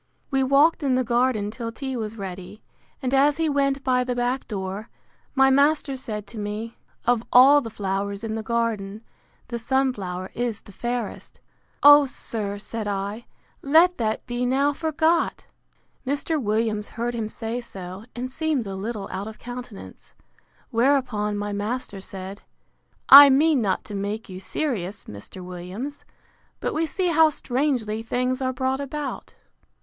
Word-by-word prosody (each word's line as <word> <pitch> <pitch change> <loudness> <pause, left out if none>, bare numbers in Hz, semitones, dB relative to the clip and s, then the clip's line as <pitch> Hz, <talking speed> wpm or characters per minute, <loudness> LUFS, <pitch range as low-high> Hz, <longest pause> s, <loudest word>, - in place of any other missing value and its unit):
We 270 -1 +2
walked 280 +6 +4
in 270 -3 +2
the 255 - +2
garden 235 -3 +1
till 230 0 -5
tea 265 +2 -5
was 225 -1 -4
ready; 190 +1 -8 0.4
and 255 0 -1
as 280 +2 +4
he 325 -1 +1
went 275 -1 +1
by 250 -1 +2
the 250 0 -2
back 245 +2 -1
door, 195 +1 -5 0.5
my 270 0 +5
master 280 0 +3
said 215 -5 -5
to 220 +2 -9
me, 210 +2 -5 0.3
Of 245 -2 +3
all 275 +4 +8
the 230 - -6
flowers 200 0 -3
in 220 -1 -3
the 220 - -2
garden, 220 -2 -2 0.5
the 235 -1 -3
sun 265 +3 +1
flower 185 -3 -6
is 240 -3 -2
the - - -14
fairest!—O, 245 +5 +2
sir, 210 -5 -4
said 215 +1 -5
I, 200 +3 -3 0.3
let 330 +5 +4
that 220 -1 -1
be 240 0 -3
now 275 +3 +2
forgot! 320 +2 0 0.6
Mr. 290 +3 -1
Williams 215 -1 0
heard 235 +1 -3
him 225 -2 -3
say 230 +2 -4
so, 190 -2 -8
and 250 +1 -4
seemed 305 -4 -1
a 195 - -5
little 205 0 -4
out 195 +2 -4
of 220 - -9
countenance: 245 -3 -10 0.6
Whereupon 235 -4 +1
my 205 0 -3
master 205 -1 -3
said, 190 +1 -8 0.7
I 280 +1 +12
mean 285 0 +4
not 195 -4 0
to 210 - -8
make 205 +2 -4
you 185 0 -7
serious, 205 - -3
Mr. 105 - -9
Williams; 185 +11 -7 0.5
but - - -2
we 320 +1 0
see 365 +2 -1
how 320 -1 +5
strangely 250 -6 -1
things 250 +3 -1
are 260 0 0
brought 260 +1 -1
about. 280 0 -5
240 Hz, 155 wpm, -24 LUFS, 210-270 Hz, 0.7 s, I